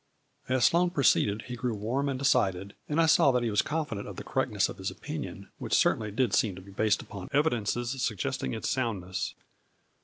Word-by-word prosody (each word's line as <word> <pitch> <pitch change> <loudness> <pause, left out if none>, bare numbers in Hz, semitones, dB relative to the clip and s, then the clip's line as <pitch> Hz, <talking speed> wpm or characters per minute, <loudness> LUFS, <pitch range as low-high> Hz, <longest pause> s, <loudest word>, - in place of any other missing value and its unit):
As 130 -3 +3
Sloane 175 +5 +4
proceeded 110 - +2
he 125 - -6
grew 120 -1 -2
warm 125 +7 -1
and 135 - -2
de 140 - -3
cided, 100 -6 +2 0.2
and 150 +2 +1
I 165 - +5
saw 155 -3 +5
that 125 -1 +1
he 115 - 0
was 105 - +3
confident 150 -10 -3
of - - -7
the - - -7
correctness - - 0
of - - -9
his - - -2
opinion, - - -7
which - - 0
certainly 110 -1 +2
did 110 0 0
seem 105 -5 +2
to 95 - -9
be 100 - -13
based 105 +1 +1
upon 95 -2 -9
evidences 120 -3 0
suggesting 95 - -2
its - - -3
soundness. 95 -7 -2
115 Hz, 205 wpm, -29 LUFS, 100-135 Hz, 0.2 s, I